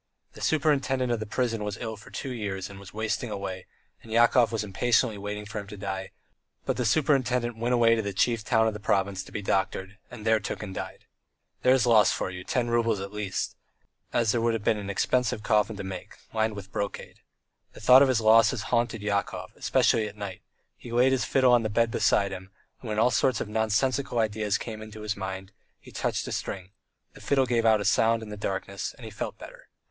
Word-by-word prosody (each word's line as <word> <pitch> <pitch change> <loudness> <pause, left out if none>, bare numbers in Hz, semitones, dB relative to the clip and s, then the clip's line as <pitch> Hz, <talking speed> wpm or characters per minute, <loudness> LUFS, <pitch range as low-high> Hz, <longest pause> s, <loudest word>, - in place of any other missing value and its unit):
The - - -12
superintendent 135 -4 +1
of 120 - 0
the 110 - -5
prison 115 -2 -1
was 105 -1 -4
ill 110 0 -4
for 105 - -14
two 135 - -5
years 100 -5 -4
and 100 - -11
was 100 -1 -12
wasting 110 +2 -2
away, 100 -3 -5 0.3
and 115 - -13
Yakov 120 +1 +4
was 110 -2 -1
impatiently 110 +2 +1
waiting 105 +1 -5
for 105 +1 -5
him 100 - -8
to 105 +1 -9
die, 95 -1 -4 0.6
but - - 0
the 125 - -1
superintendent 125 -5 +1
went 120 +2 0
away 115 -1 +5
to 115 - +1
the 100 -1 -3
chief 115 +3 +1
town 110 0 +3
of 110 - 0
the 105 - -7
province 95 -2 0
to - - -14
be 105 - -5
doctored, 95 0 -1
and 115 -3 -10
there 110 0 +4
took 105 - -5
and 95 -2 -6
died. - - -7 0.6
There's 130 -1 +4
a - - +2
loss 110 -3 +6
for - - -2
you, 90 0 -7
ten 125 +4 -1
roubles 115 -3 +2
at 100 +1 -6
least, 105 -2 -3 0.6
as 115 -2 +2
there 120 - 0
would 115 0 +2
have 110 - -4
been 105 - +2
an 100 -1 -6
expensive 110 +2 0
coffin 110 -1 +2
to 100 - -5
make, 95 -1 -7 0.2
lined 110 -1 0
with 100 -1 -9
brocade. 100 0 -5 0.5
The - - -12
thought 125 +4 +7
of 140 - +6
his 125 -3 +2
losses 110 +1 +5
haunted 115 -2 +1
Yakov, 100 -1 -2
especially 110 -2 +2
at 105 0 -10
night; 100 -3 -6 0.4
he 120 - -10
laid 125 +2 +4
his 130 -1 +1
fiddle 130 -2 +4
on 120 - +5
the 110 - -2
bed 115 +2 +1
beside 100 -2 +2
him, 95 0 -8 0.3
and 120 - -7
when 105 - -2
all 120 +3 +4
sorts 130 0 +2
of - - -3
nonsensical 110 +5 0
ideas 110 -2 +1
came 110 -2 -7
into 110 0 -9
his 105 0 -2
mind 95 0 -6 0.3
he - - -15
touched - - -2
a - - -5
string; 95 0 -4 0.4
the - - -14
fiddle 135 -2 +2
gave 115 -2 +1
out 110 -1 +5
a - - -3
sound 115 +2 +3
in 110 - -9
the 105 - -6
darkness, 100 -2 -4
and - - -12
he - - -8
felt - - -5
better. - - -12
110 Hz, 225 wpm, -27 LUFS, 100-120 Hz, 0.6 s, thought